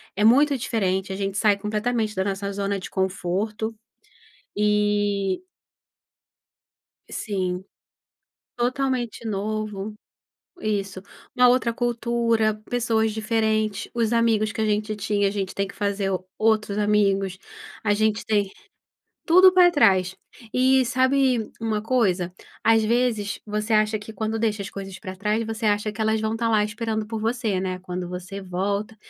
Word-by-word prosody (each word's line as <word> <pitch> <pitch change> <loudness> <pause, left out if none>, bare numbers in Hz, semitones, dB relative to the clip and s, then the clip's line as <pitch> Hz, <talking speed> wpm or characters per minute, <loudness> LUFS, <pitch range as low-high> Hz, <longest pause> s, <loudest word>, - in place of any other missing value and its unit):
é 210 - 0
muito 280 +4 +5
diferente, 190 -5 -1
a - - -4
gente 195 0 -2
sai 205 0 +4
completamente 215 +1 -1
da 190 - +1
nossa 200 0 -3
zona 200 0 -2
de - - -8
conforto, 195 +4 -2 0.8
e 205 - +1 1.7
Sim, 185 -3 -2 0.9
totalmente 250 -2 -1
novo, 210 0 -3 0.7
isso, 195 -3 -2 0.3
uma 250 0 +6
outra 245 -2 +2
cultura, 235 -2 +1
pessoas 225 -2 +1
diferentes, 220 -1 0
os 230 -1 0
amigos 225 -2 +2
que 225 - -8
a - - +2
gente 215 0 0
tinha 205 0 0
a - - -1
gente 195 -2 -3
tem 195 0 -1
que - - -12
fazer 200 -1 -1 0.3
outros 215 -2 +1
amigos, 195 -3 +2 0.5
a 205 -1 +3
gente 215 0 +1
tem 205 -3 +1 0.8
tudo 370 +2 +7
para 360 -1 +6
trás. 190 - +3 0.4
E 260 0 +4
sabe 260 -2 +2
uma 215 -2 -1
coisa? 195 -8 +1 0.3
Às 225 -1 +4
vezes 230 -3 0
você 210 +1 -2
acha 215 0 +2
que 210 +2 -10
quando 220 0 -2
deixa 215 -2 0
as 195 - -7
coisas 195 -1 -7
para 185 -3 -7
trás, 210 +3 0
você 225 0 -3
acha 210 +1 +1
que 215 - -9
elas 220 0 +2
vão 220 0 -1
estar 230 0 0
lá 215 -2 +3
esperando 220 0 -3
por 220 0 -4
você, 225 -4 0
né, 185 -1 -3
quando 180 -1 -5
você 185 +2 -6
volta. 200 +4 -2
215 Hz, 145 wpm, -24 LUFS, 200-225 Hz, 1.7 s, tudo